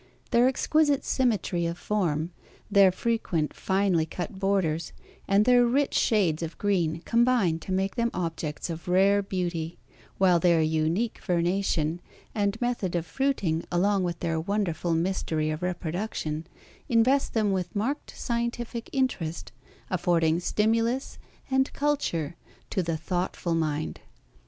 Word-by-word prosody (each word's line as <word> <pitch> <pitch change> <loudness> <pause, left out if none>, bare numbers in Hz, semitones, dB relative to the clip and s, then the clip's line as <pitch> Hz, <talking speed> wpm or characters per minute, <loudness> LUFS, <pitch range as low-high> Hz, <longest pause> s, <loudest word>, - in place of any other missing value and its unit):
Their 240 0 +5
exquisite 290 +2 +2
symmetry 205 -9 +1
of 170 +1 -4
form, 170 -6 -1 0.4
their 195 -2 +6
frequent 185 -6 -1
finely 190 -4 +1
cut 190 +4 -6
borders, 185 -5 0 0.3
and 200 +2 +4
their 245 0 +6
rich 270 +4 +1
shades 180 -8 +2
of 165 0 -5
green 170 -5 0
combine 235 -8 +3
to 190 - -7
make 190 +1 0
them 235 -1 0
objects 165 -2 -3
of 165 +2 -7
rare 195 +3 +4
beauty; 175 -4 -3 0.4
while 180 -3 +4
their 170 -1 +4
unique 160 +8 0
vernation 175 -2 0 0.3
and 205 0 0
method 240 -8 -1
of 170 -1 -1
fruiting 180 -6 0
along 190 +2 +2
with 175 -1 -3
their 165 -2 0
wonderful 175 -3 -1
mystery 160 -3 0
of 155 +2 -4
reproduction 175 -2 -3 0.4
invest 250 +4 +3
them 215 -3 +2
with 180 -2 -2
marked 260 +9 -2
scientific 235 -1 -3
interest 195 - -2 0.4
affording 170 -3 +2
stimulus 230 +7 0 0.3
and 265 0 +2
culture 280 - -1 0.4
to 190 - +1
the 165 -2 -2
thoughtful 175 +1 -2
mind. 155 -2 -1
185 Hz, 130 wpm, -27 LUFS, 165-225 Hz, 0.4 s, their